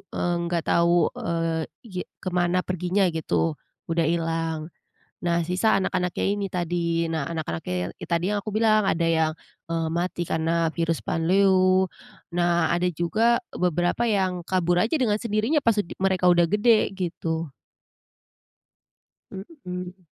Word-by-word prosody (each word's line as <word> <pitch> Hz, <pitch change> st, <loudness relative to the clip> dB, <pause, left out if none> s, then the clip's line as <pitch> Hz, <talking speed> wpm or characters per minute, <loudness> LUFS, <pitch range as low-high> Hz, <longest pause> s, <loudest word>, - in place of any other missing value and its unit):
eee, 175 Hz, 0 st, 0 dB
nggak 170 Hz, -1 st, -1 dB
tahu, 170 Hz, -1 st, +3 dB
eee, 165 Hz, -1 st, -1 dB, 0.2 s
ge 185 Hz, -5 st, -5 dB, 0.2 s
kemana 180 Hz, 0 st, 0 dB
perginya 185 Hz, +2 st, +1 dB
gitu, 85 Hz, -, 0 dB, 0.4 s
udah 165 Hz, 0 st, +2 dB
hilang. 165 Hz, -1 st, -1 dB, 0.7 s
Nah, 170 Hz, -1 st, +2 dB
sisa 185 Hz, +4 st, +2 dB
anak-anaknya 180 Hz, -2 st, -1 dB
ini 200 Hz, -1 st, -2 dB
tadi. 170 Hz, -1 st, -1 dB
Nah 160 Hz, -3 st, -1 dB
anak-anaknya 90 Hz, -, -4 dB
tadi 170 Hz, +1 st, 0 dB
yang 205 Hz, 0 st, 0 dB
aku 215 Hz, -, -4 dB
bilang, 215 Hz, -1 st, +3 dB
ada 170 Hz, -3 st, +1 dB
yang, 160 Hz, -1 st, +2 dB, 0.3 s
eee, 165 Hz, -1 st, -1 dB
mati 175 Hz, +1 st, -2 dB
karena 165 Hz, +1 st, +1 dB
virus 165 Hz, -1 st, 0 dB
panleu, 185 Hz, +2 st, +3 dB, 0.4 s
nah 175 Hz, -1 st, +1 dB
ada 175 Hz, +1 st, +1 dB
juga 220 Hz, +9 st, +2 dB
beberapa 175 Hz, +5 st, 0 dB
yang 190 Hz, -5 st, 0 dB
kabur 175 Hz, -1 st, +1 dB
aja 230 Hz, -, -1 dB
dengan 215 Hz, -5 st, +2 dB
sendirinya 225 Hz, +7 st, +1 dB
pas 230 Hz, -, +4 dB
ud 175 Hz, -, -5 dB
mereka 185 Hz, -1 st, +2 dB
udah 175 Hz, -1 st, +5 dB
gede 215 Hz, +5 st, +3 dB
gitu. 165 Hz, -3 st, -3 dB, 1.8 s
Mhm. 185 Hz, -, -8 dB
175 Hz, 130 wpm, -25 LUFS, 165-190 Hz, 1.8 s, udah